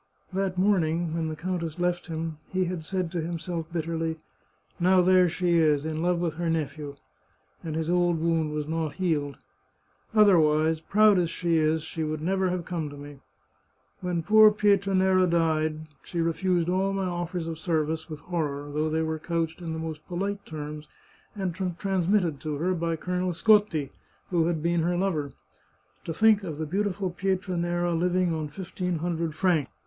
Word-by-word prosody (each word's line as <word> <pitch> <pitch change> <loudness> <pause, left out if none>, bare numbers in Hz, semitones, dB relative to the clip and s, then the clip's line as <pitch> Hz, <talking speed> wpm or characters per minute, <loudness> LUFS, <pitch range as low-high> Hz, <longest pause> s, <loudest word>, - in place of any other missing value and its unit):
That 190 -1 -1
morning, 175 -4 +2
when 165 -1 -1
the 155 - -4
countess 170 -1 -3
left 175 0 -1
him, 160 -1 -4
he 185 0 0
had 175 -2 -4
said 180 0 -2
to 175 -2 -2
himself 165 0 -4
bitterly, 165 -1 -2 0.3
" - - -38
Now 185 0 +6
there 185 -1 +5
she 175 0 +1
is, 150 -2 +3
in 160 0 -2
love 175 +1 +2
with 170 -2 -2
her 170 -1 -1
nephew! 150 -2 -3 0.3
" - - -38
and 160 -2 -4
his 160 0 -1
old 175 -1 +2
wound 165 -2 +1
was 150 -1 -3
not 160 -2 -2
healed. 145 -5 -1 0.4
" - - -27
Otherwise, 160 -5 +4
proud 210 +3 +4
as 170 -2 +1
she 170 0 0
is, 155 0 +2
she 160 - -4
would 155 0 -2
have - - -4
never 185 0 +1
come 165 -4 -3
to 145 - -10
me. 145 -1 -10 0.8
When 180 -2 -2
poor 215 +4 +7
Pietranera 190 -3 +3
died 155 -2 0
she 170 - -5
refused 170 +1 +1
all 190 +2 +1
my 195 -1 -1
offers 175 -1 -3
of 165 -1 -5
service 160 -1 -1
with 155 -2 -7
horror, 145 -4 -3
though 155 +1 0
they 160 +1 0
were 160 0 -2
couched 165 +1 -2
in 165 -2 -4
the - - -4
most 160 -1 -6
polite 200 +3 -3
terms 150 -1 -7 0.5
and 190 -4 -2 0.2
transmitted 185 -5 +1
to 155 -2 -3
her 175 +6 0
by 165 -1 -1
Colonel 180 +2 -2
Scotti, 205 -7 +3 0.4
who 165 -2 +2
had 165 -3 -1
been 170 0 +2
her 175 +2 0
lover. 155 -8 -1 0.7
To - - -3
think 220 +4 +4
of 160 -5 -5
the 160 - -3
beautiful 195 +2 -1
Pietranera 175 -2 -1
living 180 +1 +1
on 155 -1 -2
fifteen 180 +2 -4
hundred 165 -1 -2
francs 165 -5 +1
170 Hz, 180 wpm, -27 LUFS, 160-185 Hz, 0.8 s, poor